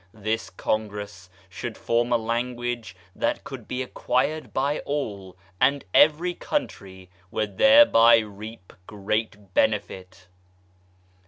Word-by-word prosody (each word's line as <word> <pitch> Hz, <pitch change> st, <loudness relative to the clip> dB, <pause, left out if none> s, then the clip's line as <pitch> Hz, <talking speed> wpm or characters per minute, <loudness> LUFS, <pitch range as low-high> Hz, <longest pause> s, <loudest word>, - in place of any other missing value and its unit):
This 110 Hz, +1 st, -3 dB
Congress 105 Hz, -2 st, -4 dB, 0.2 s
should -, -, -7 dB
form 120 Hz, +1 st, 0 dB
a 120 Hz, -, +4 dB
language 120 Hz, -3 st, -3 dB, 0.2 s
that -, -, -1 dB
could -, -, -9 dB
be 130 Hz, +1 st, -3 dB
acquired 130 Hz, +5 st, -1 dB
by 140 Hz, +3 st, 0 dB
all, 100 Hz, -11 st, -5 dB, 0.2 s
and 140 Hz, +2 st, +2 dB
every 160 Hz, +4 st, +4 dB
country 95 Hz, -, -5 dB, 0.2 s
would 105 Hz, +1 st, -4 dB
thereby 270 Hz, -, +7 dB
reap 105 Hz, -2 st, -7 dB
great 105 Hz, -1 st, -3 dB
benefit. 95 Hz, -4 st, -1 dB
110 Hz, 105 wpm, -25 LUFS, 100-125 Hz, 0.2 s, thereby